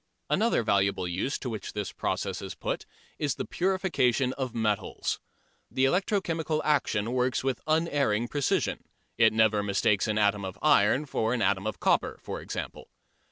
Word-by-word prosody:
Another 225 - +2
valuable 100 -3 +1
use 90 +10 -2
to - - -6
which 110 -5 -5
this 105 -1 -3
process - - -2
is - - -6
put - - -4 0.3
is 145 -6 0
the - - -4
purification 170 -10 +1
of 130 -3 -4
metals. 110 -3 -1 0.5
The 130 - +1
electro 190 +7 +2
chemical 160 -3 -1
action 120 -7 +1
works 125 -1 +1
with 130 -2 -1
unerring 145 -8 +1
precision: 145 +1 0 0.4
it 110 -1 +6
never 110 -1 +3
mistakes 100 0 +1
an 110 -1 0
atom 105 -1 +2
of 95 0 -6
iron 145 -1 +4
for 115 -3 0
an 115 - 0
atom 100 +1 +1
of 110 - -4
copper, - - +1
for - - -5
example. - - -6
120 Hz, 160 wpm, -28 LUFS, 105-145 Hz, 0.5 s, it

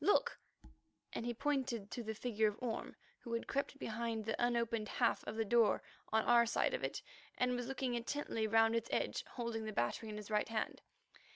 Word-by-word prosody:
Look," 475 +6 +3 0.7
and 235 - -3
he 240 - 0
pointed 250 -6 -1
to 245 - -3
the 220 -1 -4
figure 220 -1 +1
of 210 0 -2
Orme, 240 -3 -3 0.2
who 235 - -6
had 230 - -1
crept 280 0 -1
behind 225 -3 -2
the 225 - 0
unopened 235 -2 +1
half - - +2
of 210 - -3
the 225 0 0
door 230 +1 +4 0.3
on 220 0 +4
our 235 -1 +6
side - - +2
of - - -2
it - - -2 0.3
and 250 0 +2
was 245 -1 -3
looking 265 -1 -1
intently 235 -2 -1
round 225 +1 +5
its 230 0 -1
edge, - - 0
holding 235 -2 -3
the 215 - -3
battery 200 - -1
in 210 - -5
his 210 0 -8
right 210 +1 +2
hand. 225 -1 -2
230 Hz, 200 wpm, -37 LUFS, 220-245 Hz, 0.7 s, our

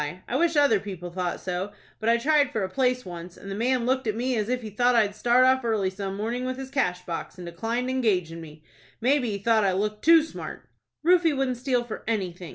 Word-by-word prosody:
I 240 - -3
wish 335 +3 +2
other 280 -8 +5
people 180 -3 -7
thought 180 0 -3
so; 185 +2 -3 0.3
but 220 - 0
I 235 - +5
tried 290 +2 +3
for 220 - -1
a 190 - -2
place 250 +3 0
once, 175 0 -8
and 195 - -9
the - - -3
man 245 +2 +1
looked 260 -1 0
at 215 - 0
me 250 +2 -1
as 215 0 -1
if 250 -1 -1
he 215 - -6
thought 245 +4 +2
I'd 210 -3 +3
start 240 +4 +4
off 260 0 +3
early 215 -5 0
some 195 0 -5
mornin' 235 +4 -2
with 255 0 -3
his 265 0 -7
cash 180 -10 -1
box, 170 +2 -5
and 180 - -8
declined 225 +9 -3
engagin' 190 -11 0
me. 155 -1 -12 0.4
Maybe 255 0 +2
he 200 - -2
thought 220 +2 +2
I 195 -2 +2
looked 210 +2 -2
too 325 -1 +7
smart." 320 - -8 0.4
"Rufie 340 -4 +4
wouldn't 260 -2 0
steal 250 -1 0
for 235 - -7
anything!" 185 -6 -3
225 Hz, 235 wpm, -26 LUFS, 190-255 Hz, 0.4 s, too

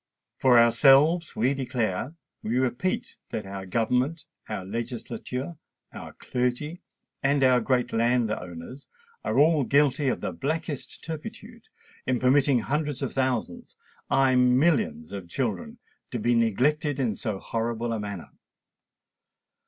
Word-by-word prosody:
For 125 -2 +5
ourselves, 135 +8 +5
we 125 +5 +2
declare—we 125 - -3
repeat 130 +8 -1
that 110 - -4
our 95 -1 -7
Government, 125 - 0 0.2
our 100 -4 -4
Legislature, 120 - -5 0.4
our - - -9
Clergy, 125 +7 -2 0.4
and 140 0 +2
our 125 -1 +5
Great 125 0 0
Landowners 115 -2 -1 0.4
are - - -1
all 150 0 +5
guilty 140 +1 +2
of 130 - 0
the - - -2
blackest 150 - -4
turpitude 220 +8 -8 0.4
in 130 -1 +2
permitting 130 0 +3
hundreds 145 +2 -2
of 135 - -3
thousands—aye, 130 +2 -1
millions 125 - +2
of 95 -4 -7
children 225 - -3 0.3
to 125 - -3
be 120 +2 +1
neglected 135 +6 +1
in 120 -5 +1
so 100 +1 -3
horrible 115 +2 -2
a 110 - -2
manner. 100 -4 -6
125 Hz, 120 wpm, -26 LUFS, 115-145 Hz, 0.4 s, For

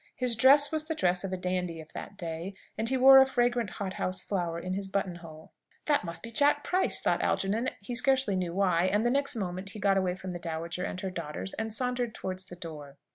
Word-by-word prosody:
His 250 -2 +1
dress 275 +5 +6
was 310 -1 -1
the 320 - -2
dress 180 -6 +1
of 195 - -4
a 185 - -2
dandy 180 -2 -2
of 160 0 -12
that 200 - -8
day, 170 +3 -5 0.2
and 225 +1 -1
he 265 - +1
wore 270 +1 +9
a - - +6
fragrant 240 -4 +1
hothouse 185 -2 -3
flower 175 -4 -2
in 185 +2 -4
his 195 +1 -3
button 195 -2 -2
hole. 160 -2 -13 0.3
"That 295 -2 +2
must 170 -1 -6
be 230 - -7
Jack 290 +4 +3
Price!" 370 +1 +1
thought - - +1
Algernon, 215 +6 0
he 220 +5 -6
scarcely 260 -4 +3
knew 180 -2 -2
why; 185 -3 +2
and 205 +4 +1
the 240 - +3
next 280 0 0
moment 185 -2 -4
he 210 - -8
got 195 0 +2
away 185 -2 0
from 185 0 -7
the 175 - -5
dowager 170 +1 -4
and 185 - -5
her 190 - -3
daughters, 170 +2 -5
and 225 0 -4
sauntered 245 0 -1
towards 185 0 -5
the 180 - -10
door. 150 -5 -9
195 Hz, 235 wpm, -29 LUFS, 180-245 Hz, 0.3 s, wore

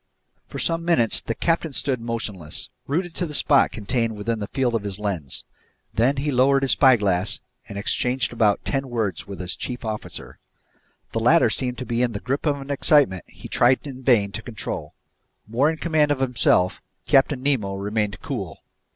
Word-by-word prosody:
For - - -8
some 165 0 -1
minutes 165 -10 +3
the 115 - -3
captain 165 -2 0
stood 130 -3 0
motionless, 105 -9 -4 0.2
rooted 170 +4 -1
to 175 - -1
the 150 - -5
spot 140 -1 +4
contained 115 +1 -1
within 110 +2 -2
the 105 - -4
field 130 -3 0
of 115 - 0
his 100 -2 -3
lens. 95 -10 -4 0.5
Then 130 +5 +2
he 145 +2 -1
lowered 135 +2 +3
his 135 - +3
spyglass 105 -8 +4 0.3
and 100 - -6
exchanged 125 +5 -1
about 110 -4 +2
ten 135 -1 -1
words 110 -8 -2
with 100 - -8
his 90 -1 -4
chief 125 -1 -5
officer. 110 -1 -6 0.7
The - - -1
latter - - +4
seemed 125 -1 -2
to 130 - -5
be 120 0 -1
in 120 -2 +1
the 100 - -4
grip 135 +7 -2
of 145 -1 +1
an 135 +1 -7
excitement 140 - +4
he - - -12
tried 125 +4 +3
in 135 -2 -8
vain 115 -6 +3
to 110 - -5
control. 110 -3 -5 0.5
More 125 +7 +2
in 160 - -3
command 155 -3 +2
of 145 -2 0
himself, 120 -8 +2 0.2
Captain 135 -2 +3
Nemo 115 -9 0
remained 105 0 -2
cool. - - -5
125 Hz, 185 wpm, -23 LUFS, 105-140 Hz, 0.7 s, spot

